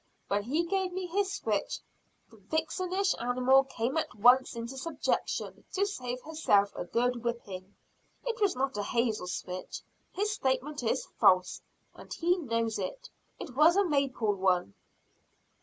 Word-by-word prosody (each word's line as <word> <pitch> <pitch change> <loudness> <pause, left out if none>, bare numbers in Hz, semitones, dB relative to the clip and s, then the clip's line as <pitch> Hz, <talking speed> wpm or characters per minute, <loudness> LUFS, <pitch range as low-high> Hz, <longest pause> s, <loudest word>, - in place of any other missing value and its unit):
When 200 +1 +1
he 285 +11 0
gave 380 0 -1
me 375 0 -3
his 390 +2 0
switch, 400 - -2 0.5
the 225 - -16
vixenish 325 - -1
animal 255 +3 +4
came 265 +1 -2
at 320 - -2
once 245 +4 +5
into 235 +3 -5
subjection 290 +2 -2
to 395 0 +2
save 250 -10 -4
herself 205 -11 +2
a - - -4
good 240 +5 0
whipping. 205 -5 -5 0.5
It 460 -2 -3
was 400 -3 +3
not 270 0 -1
a - - 0
hazel 220 -3 0
switch, 180 0 -5 0.3
his 415 +3 -1
statement 275 -5 -1
is 225 - 0
false, 185 -1 +4 0.3
and - - -14
he 350 +2 +2
knows 230 -8 -1
it, - - -5 0.3
it 250 - -8
was 310 +5 +6
a 400 0 +4
maple 275 - +1
one." 185 - +1
260 Hz, 150 wpm, -30 LUFS, 225-335 Hz, 0.5 s, was